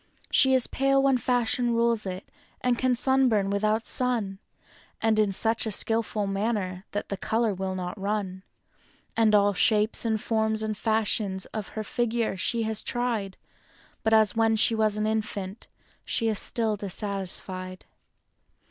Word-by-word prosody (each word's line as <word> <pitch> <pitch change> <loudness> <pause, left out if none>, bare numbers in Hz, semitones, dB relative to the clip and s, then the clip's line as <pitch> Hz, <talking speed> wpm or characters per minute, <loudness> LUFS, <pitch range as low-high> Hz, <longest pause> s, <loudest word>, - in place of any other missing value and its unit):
She 265 -1 +5
is 255 - +6
pale 275 0 +2
when 270 -2 +3
fashion 245 -1 0
rules 230 -3 +1
it, 185 +1 -6 0.7
sunburn 245 -7 +2
without 215 +2 0
sun. 225 -7 -1 0.6
And 220 -1 +2
in 210 -2 +2
such 225 +3 +1
a - - -2
skillful 225 0 0
manner 195 -2 -2
that 205 - -4
the 200 - -3
color 220 +2 0
will 190 0 -4
not 185 +2 -5
run; 200 -2 -3 0.7
And 220 -2 +3
all 205 0 +4
shapes 215 +3 +2
and 220 -2 0
forms 220 0 0
and 215 -1 -2
fashions 210 -3 0
of 215 -3 -4
her 215 - -2
figure 230 -1 -1
she 225 +4 -1
has 220 -1 +1
tried, 230 -6 -2 0.6
But 220 0 +3
as 215 -3 +3
when 225 0 +2
she 225 +2 +4
was 215 -1 +1
an 215 - -1
infant, 215 -2 -3 0.4
she 230 -2 +1
is 215 - -1
still 225 -3 0
dissatisfied. 190 -2 -4
215 Hz, 150 wpm, -26 LUFS, 200-230 Hz, 0.7 s, is